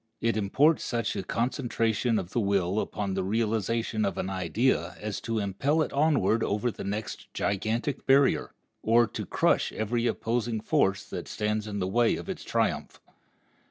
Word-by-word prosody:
It 115 0 +1
imports 135 +10 +3
such 115 -3 -1
a - - -1
concentration 115 0 0
of 95 -3 -4
the 120 - 0
will 100 -2 +1
upon 100 -2 -2
the 95 0 -1
realization 110 +1 0
of 100 -3 -1
an 95 - -2
idea 95 +1 0
as 105 -1 -4
to 115 0 -2
impel 120 - +1
it - - -6
onward 140 -6 +2
over 105 +4 0
the - - -8
next 105 +2 -5
gigantic 110 +7 -1
barrier, 135 0 +4 0.3
or 115 +2 +4
to - - -6
crush - - +2
every 115 +2 -1
opposing 115 0 -1
force 100 -2 +1
that - - -5
stands 105 0 -2
in 105 -1 -4
the 90 -2 -1
way 115 +4 +3
of - - -7
its - - -5
triumph. - - -1
110 Hz, 165 wpm, -28 LUFS, 100-120 Hz, 0.3 s, barrier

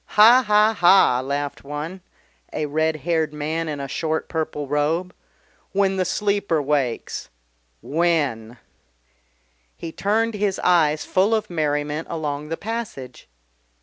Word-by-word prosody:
"Ha, 235 +5 +8
ha, 210 +1 +4
ha!" 175 - +5
laughed 140 +1 -3
one 150 +6 -6 0.5
a 155 - -2
red 155 +2 0
haired 160 -3 +1
man 155 +2 -2
in 145 -2 -4
a 140 - -4
short 160 +3 -2
purple 155 -3 -3
robe. 160 +6 0 0.6
"When 195 -1 +2
the 185 - +1
Sleeper 200 -3 0
wakes 140 -5 -2 0.5
When!" 140 -8 0 1.2
He 165 - -6
turned 225 +6 0
his 205 -2 -1
eyes 155 -4 +3
full 200 +4 +2
of 215 -3 -3
merriment 150 -1 -1
along 150 -2 -4
the 165 - -3
passage. 200 - -6
160 Hz, 125 wpm, -22 LUFS, 145-195 Hz, 1.2 s, Ha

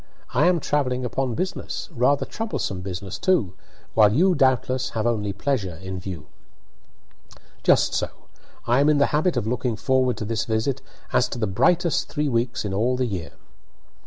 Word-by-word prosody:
"I 145 +7 +4
am 180 -1 +3
travelling 130 -4 0
upon 125 0 -1
business, 185 - -4
rather 130 +4 +2
troublesome 210 - -3
business 95 0 -6
too, 170 - +2 0.4
while 105 -2 +6
you, 180 - +4
doubtless, 130 -3 +1
have 110 - 0
only 105 -4 0
pleasure 100 - -2
in 95 +2 -6
view." 90 -5 -7 1.4
"Just - - +3
so. - - 0 0.6
I 120 +3 +3
am 145 +2 +4
in 150 - +4
the 140 - +2
habit 155 0 +2
of 115 - 0
looking 120 0 -1
forward 130 +2 +1
to 105 - -4
this 110 0 -1
visit 115 +4 -1 0.3
as 125 - +3
to - - -5
the 115 - 0
brightest 160 - +2
three 150 -1 -1
weeks 120 -2 -1
in 100 - -3
all 120 +6 +1
the 130 - +1
year." 95 -8 -5
125 Hz, 170 wpm, -24 LUFS, 105-140 Hz, 1.4 s, while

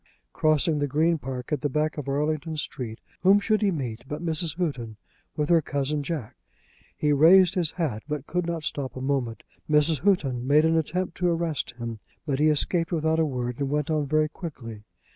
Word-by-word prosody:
Crossing 155 0 +2
the 145 - 0
Green 160 +4 +2
Park, 130 +1 -6
at 150 -3 0
the 145 - 0
back 155 +3 0
of 145 -2 -5
Arlington 155 +2 -1
Street, 120 -5 -5 0.2
whom 195 +2 +6
should 215 +1 +1
he 205 - +3
meet 125 - -4
but 150 +4 -5
Mrs. 165 0 -1
Houghton 125 - -3 0.4
with 150 -1 0
her 170 -2 +5
cousin 145 +1 -2
Jack. 145 -6 -5 0.6
He 150 -1 +2
raised 175 +5 +6
his 175 -5 +1
hat, 145 -12 -2
but 150 -2 -4
could 180 +1 -2
not 170 -2 -3
stop 140 -3 -3
a - - -4
moment. 130 -4 -2 0.3
Mrs. 150 0 +3
Houghton 135 -10 +1
made 150 +3 +5
an 160 0 +3
attempt 170 +3 -1
to 180 -1 +1
arrest 165 -3 -1
him, 115 -2 -5 0.3
but 140 -3 -1
he 155 - +4
escaped 165 +3 +1
without 160 -1 +1
a 160 - +3
word 125 -2 -3
and 140 -1 -1
went 150 +1 -1
on 150 -2 0
very 155 +1 +2
quickly. 120 - -8
150 Hz, 200 wpm, -26 LUFS, 135-165 Hz, 0.6 s, whom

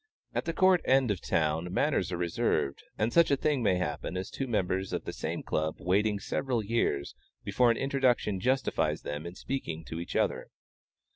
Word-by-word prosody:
At - - -1
the 165 - -1
Court 185 0 +4
End 130 -3 +3
of 95 - -3
the - - -10
town 80 +2 0
manners 130 - +1
are 90 - -2
reserved; 85 -5 0 0.2
and 110 +2 0
such 170 -1 +5
a 140 - +4
thing 145 -2 +1
may 100 -5 +3
happen 90 +1 -3
as 95 +1 -4
two 135 - -3
members 95 -4 -1
of - - -2
the - - -4
same - - -4
Club 80 0 -1
waiting 105 +3 +2
several 120 +1 -1
years, 100 -11 0 0.3
before 125 -1 +3
an 115 - +2
introduction 130 -7 +1
justifies 130 +7 0
them 75 +3 -4
in 85 - -8
speaking 80 -13 -4
to 80 - -5
each 85 - -6
other. - - 0
105 Hz, 195 wpm, -30 LUFS, 85-130 Hz, 0.3 s, such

